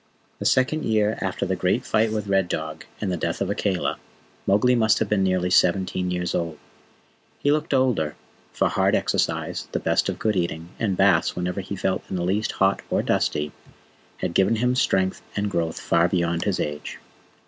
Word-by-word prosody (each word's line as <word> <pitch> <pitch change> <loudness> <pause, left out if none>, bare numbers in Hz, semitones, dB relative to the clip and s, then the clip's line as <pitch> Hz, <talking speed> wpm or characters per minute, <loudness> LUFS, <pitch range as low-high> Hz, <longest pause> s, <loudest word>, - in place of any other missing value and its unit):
The - - -5
second 140 +4 +2
year 110 -1 +1
after - - -2
the - - -1
great - - 0
fight 110 0 +2
with 105 -1 -2
Red 95 -2 +2
Dog 80 -1 -4
and 100 -3 -2
the 90 - -1
death 85 0 -2
of 100 0 -1
Akela, 85 -8 -1 0.5
Mowgli 115 +6 +4
must 110 -2 +3
have 110 - 0
been 100 -1 +1
nearly 90 -1 +1
seventeen 90 0 +2
years 90 0 -2
old. 85 -2 -2 0.8
He 145 - +1
looked 155 +2 0
older, 125 - +1 0.4
for - - +1
hard - - +2
exercise, - - -1
the - - 0
best - - +1
of - - -3
good 110 -2 0
eating, 85 -2 -2
and 100 -5 0
baths 95 -4 +3
whenever 90 +2 -2
he 100 +2 -6
felt 95 0 -1
in - - -3
the 90 - -1
least 100 +4 0
hot 95 0 +2
or - - +1
dusty, 75 0 0 0.7
had - - -3
given 95 +5 +3
him 125 +3 +1
strength 95 -6 +1
and 100 0 -1
growth 85 -3 -1
far 85 +1 +2
beyond 85 -2 0
his 100 -3 0
age. 75 0 -4
95 Hz, 190 wpm, -24 LUFS, 85-105 Hz, 0.8 s, Mowgli